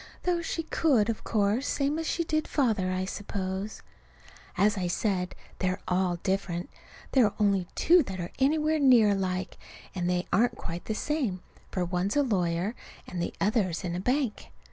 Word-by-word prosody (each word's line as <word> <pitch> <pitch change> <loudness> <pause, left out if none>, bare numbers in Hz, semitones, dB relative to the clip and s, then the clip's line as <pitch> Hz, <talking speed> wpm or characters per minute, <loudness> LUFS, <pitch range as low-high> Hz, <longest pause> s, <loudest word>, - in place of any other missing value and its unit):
Though 350 -1 +1
she 330 0 -3
could, 270 -9 +2
of 220 - -7
course, 215 +5 +1
same 285 +2 0
as 325 - -3
she 335 - 0
did 310 -1 -1
Father, 220 -10 +1
I 185 0 -1
suppose. 195 +1 -4 0.7
As 205 +3 +4
I 185 -3 -1
said, 180 0 -1 0.2
they're 185 -1 0
all 180 -1 +1
different. 190 -2 -1 0.4
There 260 -4 +5
are 205 - -1
only 200 -4 +2
two 350 +2 +5
that 190 -1 -6
are 175 - -4
anywhere 305 +3 +2
near 250 -6 +6
alike, 190 -2 -2 0.3
and 180 -2 -1
they 180 0 0
aren't 235 +3 +3
quite 170 +1 -6
the 220 - -2
same, 250 - -1 0.3
for 180 -2 -1
one's 180 +3 -1
a 290 - +4
lawyer 185 -3 0 0.3
and 175 - -5
the - - -3
other's 195 -5 +1
in 175 -2 -2
a 175 - -2
bank. 250 +2 -1
200 Hz, 175 wpm, -28 LUFS, 185-260 Hz, 0.7 s, near